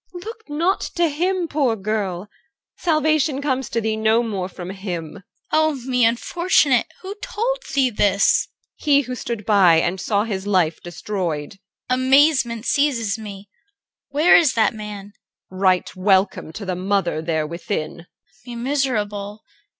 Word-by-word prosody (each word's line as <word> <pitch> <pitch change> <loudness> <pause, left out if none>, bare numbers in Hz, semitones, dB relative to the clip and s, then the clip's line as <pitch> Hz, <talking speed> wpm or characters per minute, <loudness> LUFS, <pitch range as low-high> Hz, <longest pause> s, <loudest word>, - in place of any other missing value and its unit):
Look 440 +2 -9
not 335 +6 0
to 340 -2 +2
him, 355 +4 -1
poor 280 -6 +1
girl! 200 -3 -3 0.5
Salvation 310 -3 +1
comes 265 -3 -2
to 230 - -1
thee 220 -1 -1
no 220 +2 +2
more 195 -5 -3
from 180 0 -8
him. 180 -4 -6
CHR. - - -13 0.3
Oh 315 -1 +2
me, 250 -1 -1
unfortunate! 265 +2 +2 0.2
Who 385 +1 -5
told - - -2 0.2
thee 265 -2 +3
this? 200 -2 +2
EL. - - -49 0.2
He 285 -2 +3
who 255 -2 -6
stood 235 -4 -5
by 195 -6 +5
and 175 +3 0
saw 205 0 +1
his 200 -3 -4
life 180 -5 +1
destroyed. 175 -4 -4 0.4
CHR. 255 - 0
Amazement 260 -3 +3
seizes 235 -8 +1
me. 205 -2 -9 0.6
Where 300 +5 +5
is 310 -6 +5
that 220 -2 +2
man? 205 -2 -8 0.4
EL. 185 - -10
Right 185 -2 +2
welcome 190 -3 +1
to 205 - -7
the 185 -1 -2
mother 185 -3 -1
there 160 -1 -1
within. 170 0 -5 0.4
CHR. - - -27
Me 240 - -6
miserable! 215 -6 -2
220 Hz, 155 wpm, -21 LUFS, 195-280 Hz, 0.6 s, by